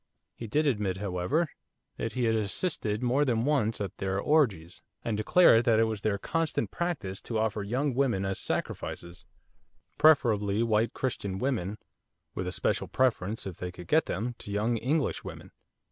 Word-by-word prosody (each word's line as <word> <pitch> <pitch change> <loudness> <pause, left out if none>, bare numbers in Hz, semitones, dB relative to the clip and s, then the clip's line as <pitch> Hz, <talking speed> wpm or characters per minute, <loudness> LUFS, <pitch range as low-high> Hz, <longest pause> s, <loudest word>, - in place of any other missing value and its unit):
He 115 - -7
did 150 +8 +1
admit, 105 -9 0
however, 100 - 0 0.5
that 115 - -3
he 125 - -1
had 115 -1 +3
assisted 110 - -1
more 130 +4 +3
than 120 -4 +1
once 135 -7 +1
at 100 -3 -4
their 95 0 -1
orgies, 100 - +1 0.2
and 115 - 0
declared 115 +2 +5
that 115 -2 +4
it - - +5
was 110 -2 -2
their 105 -1 0
constant 165 +9 -1
practice 150 - -3
to 115 - -3
offer 110 -1 0
young 130 +7 -1
women 120 -7 +1
as 95 0 -2
sacrifices 85 +1 -4 0.7
preferably 110 -8 +4
white 110 0 +1
Christian 100 -7 -3
women, 110 -5 -1 0.6
with 90 - -3
a - - -2
special 90 - -1
preference, 115 -5 0
if 95 -4 -6
they 90 0 -5
could 90 0 -11
get 160 +1 +3
them, 115 +7 -2
to 105 - -8
young 110 +3 +1
English 140 +6 0
women. - - -9
110 Hz, 170 wpm, -29 LUFS, 100-130 Hz, 0.7 s, declared